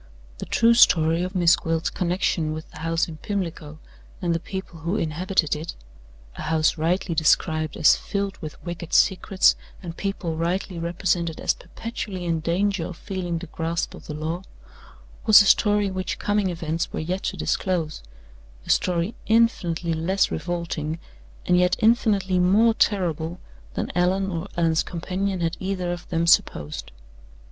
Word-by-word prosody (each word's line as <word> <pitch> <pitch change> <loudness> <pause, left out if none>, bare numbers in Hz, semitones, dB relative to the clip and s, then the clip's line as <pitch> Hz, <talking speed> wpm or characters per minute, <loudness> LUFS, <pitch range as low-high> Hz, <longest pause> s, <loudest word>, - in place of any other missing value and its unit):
The - - -6
true 230 +1 +4
story 165 -7 +5
of 185 +2 -4
Miss 175 -2 +5
Gwilt's 165 0 -2
connection 175 -3 0
with 155 0 -8
the - - -11
house 165 +1 0
in 160 -2 -8
Pimlico 165 -5 -4 0.4
and 175 -3 0
the 165 - 0
people 190 -1 -7
who 170 +5 -2
inhabited 170 -2 0
it 160 +3 -6 0.6
a - - -6
house 155 -1 +2
rightly 170 +3 0
described 155 0 +1
as 160 - +6
filled 200 -1 -3
with 155 -2 -8
wicked 170 -1 -6
secrets, 190 0 +4 0.2
and 170 -3 -7
people 185 -5 -3
rightly 175 +2 -2
represented 170 -1 -1
as - - +1
perpetually 205 -5 -6
in 165 -1 0
danger 180 +2 0
of 180 - -8
feeling 180 -4 -3
the 170 - -6
grasp 165 0 -3
of - - -12
the 150 - -5
law 160 +3 -3 0.9
was 215 - +10
a - - -3
story 205 0 +3
which 185 0 -3
coming 205 -2 0
events 165 -1 -3
were - - -4
yet 180 +4 -2
to - - -3
disclose: 170 -5 -1 0.6
a - - 0
story 180 +4 +1
infinitely 180 -7 +2
less 180 +5 +1
revolting, 165 -1 -3 0.5
and 180 0 +4
yet 180 0 +3
infinitely 210 -5 +2
more 210 +6 +4
terrible, 175 -5 0 0.4
than - - -2
Allan 190 +2 +1
or 170 +2 -4
Allan's 165 -2 +3
companion 185 +2 -3
had 165 0 -1
either 185 -2 -2
of 175 0 -7
them 165 0 0
supposed. 75 - +1
175 Hz, 155 wpm, -24 LUFS, 165-190 Hz, 0.9 s, was